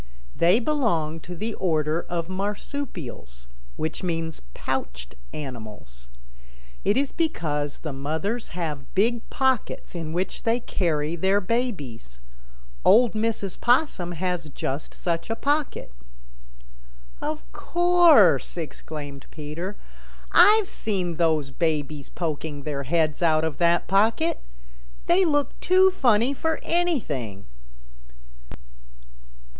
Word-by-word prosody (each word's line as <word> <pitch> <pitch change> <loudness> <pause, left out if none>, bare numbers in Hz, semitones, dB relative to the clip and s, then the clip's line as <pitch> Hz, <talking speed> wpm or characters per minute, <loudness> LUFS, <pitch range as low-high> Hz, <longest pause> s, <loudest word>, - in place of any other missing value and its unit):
"They 175 +6 +4
belong 215 - 0
to 175 +2 -8
the 220 +6 -3
order 160 -3 0
of 170 -1 -2
Marsupials, 185 - -5 0.3
which 160 0 -3
means 165 -3 -2
pouched - - -4 0.2
animals. 105 - -8 0.7
It 205 +4 +2
is 275 0 +1
because 150 - -1
the 155 -3 -6
mothers 160 - -2
have 150 -6 -4
big 230 +4 +2
pockets 260 -3 0
in 165 -3 -4
which 180 +3 -2
they 230 +1 +1
carry 165 -8 -1
their 190 +4 +2
babies. 180 - -3 0.7
Old 240 +1 +6
Mrs. 215 -3 -2
Possum 240 - +2
has 175 -2 -2
just 140 +1 -4
such 170 +1 -2
a 225 - 0
pocket." 285 - -1 1.3
"Of - - -3
course," 345 - +4
exclaimed 150 -3 -7
Peter. 160 +6 -6 0.6
"I've 425 -1 +7
seen 185 - -2
those 155 -5 +1
babies 150 -2 -2
poking 155 -3 -4
their 140 -2 -3
heads 155 +2 +1
out 160 -2 +3
of 160 -3 -2
that 170 0 +3
pocket. 225 - +2 0.6
They 365 +2 +4
look 290 -3 0
too 375 +1 +5
funny 245 - +3
for 320 +3 -1
anything." 150 - -1
175 Hz, 110 wpm, -25 LUFS, 150-230 Hz, 1.3 s, I've